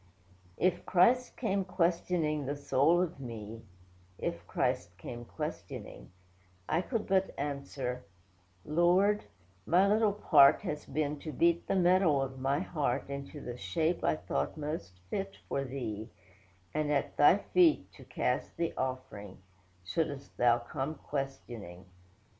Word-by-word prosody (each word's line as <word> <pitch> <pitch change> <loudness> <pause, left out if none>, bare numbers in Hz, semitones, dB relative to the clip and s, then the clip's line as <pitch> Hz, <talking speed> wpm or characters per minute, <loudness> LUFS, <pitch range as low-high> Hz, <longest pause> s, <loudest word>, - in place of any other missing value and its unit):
If 180 -1 +1
Christ 240 +8 +3
came 200 -5 0
questioning 170 -5 0
the 145 - -1
soul 145 +5 +3
of 170 -5 -5
me, 115 -3 -7 0.6
(If - - -4
Christ 90 +1 -1
came 120 +4 -7
questioning,) - - -6 0.6
I 165 - +2
could 225 +2 -2
but 190 0 +1
answer, 140 -3 -3 0.6
'Lord, 180 +6 +3 0.4
my 185 +4 +5
little 210 0 +3
part 150 -9 +6
Has 150 0 -4
been 150 +1 -1
to 155 - -6
beat 170 +4 +2
the - - +1
metal 180 -5 +4
of 130 -1 -3
my 135 +4 +1
heart, 150 -6 -2
Into 140 +1 -6
the 120 0 -6
shape 165 +1 0
I 75 - +3
thought 70 - -2
most 150 - -5
fit 195 0 -3
for 135 - -1
Thee; 120 -5 -5 0.6
And 150 -1 0
at 140 -2 0
Thy 145 +6 +6
feet, 330 - +3
to - - -14
cast - - -2
the 170 -1 -1
offering; 130 -7 -4 0.5
Shouldst 140 - -3
Thou 120 -1 +5
come 135 +5 -4
questioning. 120 - -6
150 Hz, 135 wpm, -31 LUFS, 130-180 Hz, 0.6 s, part